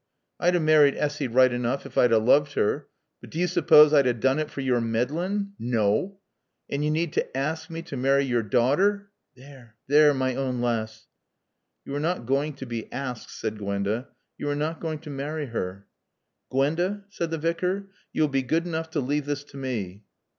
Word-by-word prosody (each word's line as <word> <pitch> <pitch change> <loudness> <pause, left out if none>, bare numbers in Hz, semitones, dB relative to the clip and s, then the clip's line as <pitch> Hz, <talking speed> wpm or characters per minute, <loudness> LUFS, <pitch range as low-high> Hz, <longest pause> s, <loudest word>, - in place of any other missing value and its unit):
I'd 175 +1 +3
a - - +3
married 155 -3 +5
Assy 150 -2 -1
right 130 +1 +4
enoof 120 +2 -2
ef - - -11
I'd 125 - +4
'a' 115 - +6
looved 140 +6 +3
her. 105 - 0 0.3
But - - -13
do - - -8
yo' 180 - +2
suppawss 155 -4 +6
I'd 140 -3 +5
'a' 120 - +2
doon 130 +5 +1
it 155 -1 -2
fer 140 - -6
yore 125 -3 +1
meddlin'? 165 - -1
Naw! 115 - +1 0.5
An' 140 - -2
yo' 150 - +1
need 160 +1 -1
n' - - +2
aassk 160 +5 -2
mae 165 0 -6
t' 145 - -7
marry 135 +2 +3
yore 120 -3 +1
daughter 165 - +1 0.2
(There 130 -3 -15
there 145 +1 +5
my 130 -1 0
awn 130 -2 -2
laass) 110 -2 -2 0.4
" - - -54
"You 140 - -6
are 145 - -1
not 165 -4 -1
going 140 +4 0
to 135 - -7
be 120 -2 -6
asked," 125 -3 -5
said 110 -1 -5
Gwenda. 100 +4 -2 0.3
"You 145 - -2
are 145 - 0
not 155 +3 -2
going 160 -2 -3
to 150 - -8
marry 145 +2 -4
her." 100 -5 -5 0.6
"Gwenda," 175 +9 0
said 170 -4 -3
the 165 - -2
Vicar, 180 +5 -2 0.2
"you 155 - +1
will - - +3
be 135 -1 0
good 160 +7 0
enough 160 -1 -3
to 160 -2 -1
leave 145 +2 -1
this 145 0 -2
to 140 - -14
me." 110 -8 -4
140 Hz, 205 wpm, -26 LUFS, 120-160 Hz, 0.6 s, a